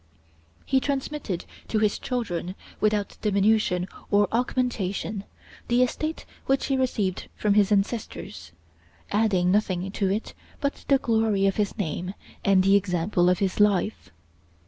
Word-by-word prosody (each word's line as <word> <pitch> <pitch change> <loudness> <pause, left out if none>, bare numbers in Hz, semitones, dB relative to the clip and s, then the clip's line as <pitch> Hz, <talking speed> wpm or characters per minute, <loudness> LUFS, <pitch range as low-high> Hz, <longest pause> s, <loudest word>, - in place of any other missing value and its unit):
He 265 - +3
transmitted 275 - -3 0.2
to 220 - 0
his 215 -1 +1
children, 185 -8 -3 0.2
without 210 -1 0
diminution 200 -3 +2 0.2
or 205 0 +4
augmentation, 220 -5 -1 0.4
the 245 +1 +4
estate 310 +6 -3 0.2
which 270 0 +2
he 275 - +1
received 215 -8 -1
from 210 -1 +1
his 205 0 +4
ancestors, 205 - -2 0.6
adding 200 -4 +2
nothing 190 -2 0
to 195 -1 0
it 205 +4 -2 0.3
but 280 0 -3
the 275 - +5
glory 220 -5 +1
of 195 - +1
his 205 -2 -1
name 180 +1 -3 0.3
and 195 -1 +4
the 195 +1 +5
example 180 -1 +2
of 180 - +3
his 190 +1 -1
life. 210 0 +2
205 Hz, 135 wpm, -26 LUFS, 190-225 Hz, 0.6 s, the